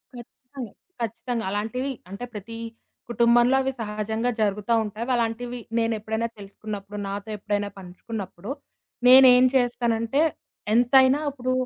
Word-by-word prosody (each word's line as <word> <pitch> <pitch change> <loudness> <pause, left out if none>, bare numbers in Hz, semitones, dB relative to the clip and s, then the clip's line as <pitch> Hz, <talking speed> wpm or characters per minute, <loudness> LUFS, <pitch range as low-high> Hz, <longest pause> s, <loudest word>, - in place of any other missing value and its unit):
ఖచ్చితంగా 245 0 -10 0.3
ఖచ్చితంగా! 230 +1 -3
అలాంటివి 225 +7 -2 0.2
అంటే 200 +6 -6
ప్రతి 215 +2 -7 0.5
కుటుంబంలో 240 +2 +4
అవి 265 0 -1
సహజంగా 220 +2 -2
జరుగుతా 210 +2 0
ఉంటాయి. 215 +2 -5
అలాంటివి 240 +1 -2 0.2
నేను 230 0 +1
ఎప్పుడైనా 220 +2 -2
తెలుసుకున్నప్పుడు 205 0 -8
నాతో 200 +2 -5
ఎప్పుడైనా 205 0 -2
పంచుకున్నప్పుడు 190 +1 -8 0.6
నేనేం 255 -1 +8
చేస్తానంటే 240 +1 +1 0.5
ఎంతైనా 260 +4 +5
ఇప్పుడు 255 -2 -3
230 Hz, 110 wpm, -25 LUFS, 210-245 Hz, 0.6 s, నేనేం